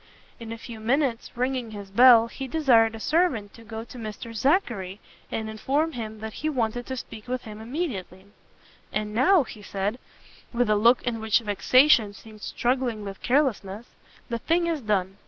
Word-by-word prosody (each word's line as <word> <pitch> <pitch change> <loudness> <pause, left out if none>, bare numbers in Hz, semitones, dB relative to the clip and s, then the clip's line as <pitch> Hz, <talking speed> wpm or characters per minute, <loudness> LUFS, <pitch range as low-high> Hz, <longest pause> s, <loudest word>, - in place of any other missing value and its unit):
In 230 -1 -8
a 230 - -5
few 230 0 -9
minutes, 250 +1 0
ringing 250 -1 -1
his 200 -2 -9
bell, 235 +1 +8
he 265 +3 -7
desired 240 -6 +3
a - - -8
servant 265 - +1
to 230 - -14
go 220 0 -7
to 240 +1 -11
Mr 225 +1 -7
Zackery, 220 - 0 0.3
and 220 -1 -3
inform 275 +9 -1
him 220 -5 -7
that 220 0 -6
he 310 - 0
wanted 245 -3 -2
to 260 - -4
speak 220 -2 -9
with 255 0 -3
him 215 0 -9
immediately. 220 - -5 0.7
"And 210 0 -2
now," 290 - +4
said 205 -2 -4 0.6
he, 235 - -9
with 245 -3 +2
a - - +4
look 235 +4 +4
in 235 -2 -2
which 220 0 +2
vexation 225 +1 +4
seemed 215 0 -14
struggling 245 -3 -1
with 195 -1 -8
carelessness, 235 -6 0 0.4
"the 235 -1 -3
thing 340 +7 +1
is 330 -4 -1
done! 195 -3 -1
230 Hz, 175 wpm, -25 LUFS, 215-260 Hz, 0.7 s, bell